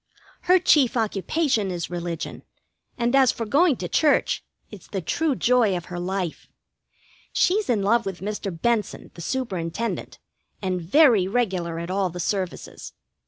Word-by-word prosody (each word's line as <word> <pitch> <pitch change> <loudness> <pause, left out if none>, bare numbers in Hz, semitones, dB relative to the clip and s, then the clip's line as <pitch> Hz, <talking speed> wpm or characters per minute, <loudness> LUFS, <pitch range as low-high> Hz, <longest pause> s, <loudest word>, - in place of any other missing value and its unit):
Her 365 - +8
chief 285 -8 +3
occupation 220 - 0
is 175 -1 -4
religion, 170 -2 -5 0.6
and 240 +1 +1
as 265 -2 +5
for 230 - -5
going 290 +6 +3
to - - -5
church, 300 -2 +2 0.3
it's 210 -4 -12
the 195 - -3
true 285 - 0
joy 235 -7 +3
of 175 - -7
her 175 - -3
life. 185 -2 -3 0.9
She's 405 0 +2
in 215 -5 +2
love 230 +2 +2
with 190 -2 -5
Mr. 205 0 -4
Benson, 210 +5 -2
the 170 - -10
Superintendent, 215 -2 -3 0.4
and 185 -2 -2
very 215 - +4
regular 190 -7 -1
at 170 +2 -5
all 190 -1 0
the 180 +1 -8
services. 185 0 -4
205 Hz, 150 wpm, -24 LUFS, 180-250 Hz, 0.9 s, Her